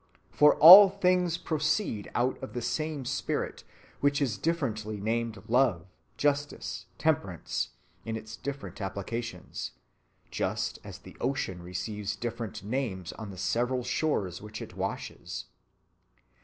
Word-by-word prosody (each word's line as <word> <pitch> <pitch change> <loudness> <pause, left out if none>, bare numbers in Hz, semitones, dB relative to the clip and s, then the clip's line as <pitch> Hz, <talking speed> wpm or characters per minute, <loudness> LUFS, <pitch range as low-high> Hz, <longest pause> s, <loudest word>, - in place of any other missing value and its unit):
For 150 0 +6
all 190 +5 +12
things 180 -3 +2
proceed 155 - -1
out 125 +2 0
of 105 - -7
the 120 - -3
same 145 +3 -2
spirit, - - -2 0.4
which 140 0 +2
is 130 -8 0
differently 110 -11 -1
named 110 -1 -2
love, 120 -8 +2 0.3
justice, 145 0 -1
temperance, - - -1 0.3
in 115 - -3
its 110 0 -8
different 140 -3 -6
applications, 100 +1 -5 0.6
just - - -2
as - - -8
the - - -14
ocean 95 -10 -2
receives 95 +4 -4
different 115 -4 -5
names 105 -6 -3
on 110 -2 -8
the 95 - -9
several 120 +6 0
shores 115 - -1
which 105 +1 -8
it - - -9
washes. - - -5
120 Hz, 125 wpm, -29 LUFS, 105-145 Hz, 0.6 s, all